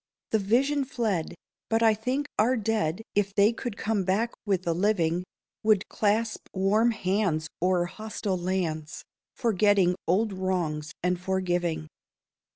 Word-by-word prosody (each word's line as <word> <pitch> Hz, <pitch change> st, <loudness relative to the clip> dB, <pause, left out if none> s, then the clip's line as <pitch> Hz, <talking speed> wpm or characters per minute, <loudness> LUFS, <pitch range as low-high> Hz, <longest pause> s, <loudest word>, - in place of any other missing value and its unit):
The 220 Hz, -, +3 dB
vision 270 Hz, +8 st, +2 dB
fled; 220 Hz, -, -2 dB, 0.3 s
but 225 Hz, +1 st, +2 dB
I 220 Hz, -1 st, +6 dB
think 255 Hz, +7 st, -2 dB
our 245 Hz, +4 st, +4 dB
dead, 215 Hz, -4 st, -1 dB
If 200 Hz, -1 st, 0 dB
they 205 Hz, +3 st, +5 dB
could 235 Hz, -2 st, -5 dB
come 210 Hz, -3 st, 0 dB
back 205 Hz, +6 st, 0 dB
with 190 Hz, -3 st, +1 dB
the 170 Hz, -, 0 dB
living, 175 Hz, -2 st, +1 dB, 0.4 s
Would 215 Hz, -3 st, +2 dB
clasp 220 Hz, +2 st, 0 dB
warm 205 Hz, +5 st, +3 dB
hands 185 Hz, -7 st, 0 dB
o'er 180 Hz, -1 st, +2 dB
hostile 210 Hz, 0 st, -4 dB
lands, 170 Hz, -3 st, -2 dB, 0.3 s
Forgetting 205 Hz, -5 st, +3 dB
old 200 Hz, +4 st, +2 dB
wrongs 170 Hz, -5 st, -2 dB
and 180 Hz, 0 st, 0 dB
forgiving. 175 Hz, -4 st, -1 dB
195 Hz, 135 wpm, -27 LUFS, 180-220 Hz, 0.4 s, I